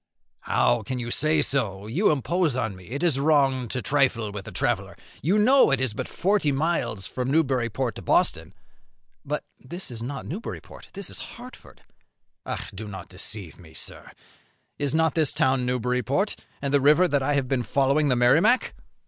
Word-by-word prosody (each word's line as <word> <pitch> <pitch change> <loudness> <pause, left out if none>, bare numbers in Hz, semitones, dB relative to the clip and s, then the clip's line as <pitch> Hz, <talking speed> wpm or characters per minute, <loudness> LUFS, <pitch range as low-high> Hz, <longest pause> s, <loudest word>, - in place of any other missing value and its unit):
"How - - +2
can 130 - -4
you 120 -1 -4
say 155 +2 +2
so? 105 -9 -1
you 155 - +2
impose 155 +1 +1
on 110 -6 -2
me; 90 +1 -14
it 140 +7 -4
is 155 -6 +2
wrong 135 -4 +3
to 125 +2 -4
trifle 125 -7 +1
with 100 -1 -7
a - - -6
traveller; - - -1 0.3
you 180 +8 +2
know 255 +3 +5
it 135 -3 +2
is 130 -4 0
but - - -4
forty 190 -5 +1
miles 140 - -1
from 125 0 -3
Newburyport 130 -5 +1
to - - -9
Boston." - - +1 0.7
"But - - -3 0.2
this 170 +4 -7
is 115 -2 -6
not 135 +4 -5
Newburyport; 205 +9 -8
this 200 -1 -3
is - - -1 0.2
Hartford." 250 +1 -13 0.9
"Do 105 +3 -7
not 95 -2 -8
deceive 95 -1 -5
me, 80 -3 -15
sir. - - -6 0.7
Is 145 +1 0
not 160 -1 +3
this 155 -4 +2
town 130 -1 +2
Newburyport, 125 - 0 0.3
and 140 0 -1
the 140 - +4
river 150 +6 +5
that 145 -4 +1
I 145 +2 +1
have 135 -2 0
been 130 -1 0
following 140 +4 +2
the 125 - +3
Merrimac?" 160 - +4
135 Hz, 175 wpm, -25 LUFS, 120-155 Hz, 0.9 s, know